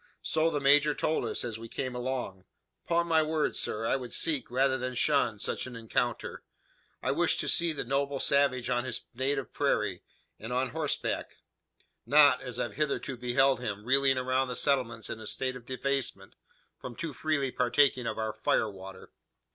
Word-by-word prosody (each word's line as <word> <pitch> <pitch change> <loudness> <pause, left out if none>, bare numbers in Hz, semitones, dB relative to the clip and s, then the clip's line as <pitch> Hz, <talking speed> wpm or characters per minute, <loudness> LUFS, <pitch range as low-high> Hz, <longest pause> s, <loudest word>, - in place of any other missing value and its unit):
So 160 +1 +2
the 150 - -1
major 145 +2 +4
told 155 - 0
us, - - 0
as 115 -2 -5
we 115 0 -9
came 130 +1 -3
along. 125 -7 -4 0.4
'Pon 170 0 +2
my 165 -2 +3
word, 155 0 0
sir, 110 +1 -2
I 135 - +1
should 125 -2 -7
seek, 145 -7 +1
rather 130 +2 +2
than 125 0 -3
shun, 125 -5 +2
such 105 - -2
an 125 - -9
encounter. 115 +1 -2 0.6
I - - +1
wish - - +2
to - - -2
see 170 -1 +2
the 155 - -3
noble 140 +2 -1
savage 140 -3 +2
on 120 -1 0
his 130 - -4
native 135 +2 -2
prairie, - - 0 0.4
and 110 +3 -7
on 130 +1 0
horseback; 155 -2 -2 0.7
not, 145 +1 +6
as 125 -3 -6
I've 120 - -3
hitherto 145 -3 -1
beheld 125 +1 +2
him, 105 -4 -5
reeling 135 +1 +3
around 130 +1 +1
the 125 - -4
settlements 120 -5 0
in 110 - -6
a 110 - -8
state 130 -1 -2
of 125 -1 -11
debasement 130 -6 -3 0.5
from 120 - -8
too 160 +2 -5
freely 140 -2 -1
partaking 125 0 +2
of - - -3
our 110 -1 -2
fire 110 0 +1
water." 95 -1 -11
130 Hz, 180 wpm, -29 LUFS, 120-140 Hz, 0.7 s, not